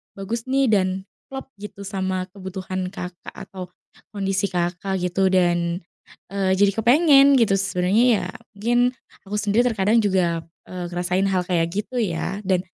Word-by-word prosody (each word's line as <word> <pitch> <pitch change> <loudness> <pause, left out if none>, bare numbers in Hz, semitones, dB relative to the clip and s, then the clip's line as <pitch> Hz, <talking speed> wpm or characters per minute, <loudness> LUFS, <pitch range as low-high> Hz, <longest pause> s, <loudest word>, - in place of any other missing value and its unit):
bagus 225 +5 -5
nih 270 0 +2
dan 190 -1 +1 0.2
klop 270 0 -8
gitu 200 -1 -9
sama 190 -1 -2
kebutuhan 185 -1 -5
Kakak 180 -2 -8
atau 185 -2 -8 0.5
kondisi 195 0 0
Kakak 180 +2 -1
gitu 190 +2 +1
dan, 175 -1 +2 0.5
eee, 195 -1 0
jadi 200 +1 +4
kepengen 275 +2 +6
gitu. 205 -4 +3
Sebenernya 190 +4 +2 0.2
ya - - -4 0.3
mungkin 240 +4 +2 0.4
aku 210 - -4
sendiri 215 +4 +2
terkadang 220 0 +2
juga, 175 -4 +1 0.2
eee, 180 -1 -5
ngerasain 180 +2 0
hal 185 -2 +1
kayak 170 -2 +1
gitu 240 +4 -2
ya 195 -1 -2
dan 185 -2 +3
195 Hz, 145 wpm, -23 LUFS, 180-210 Hz, 0.5 s, kepengen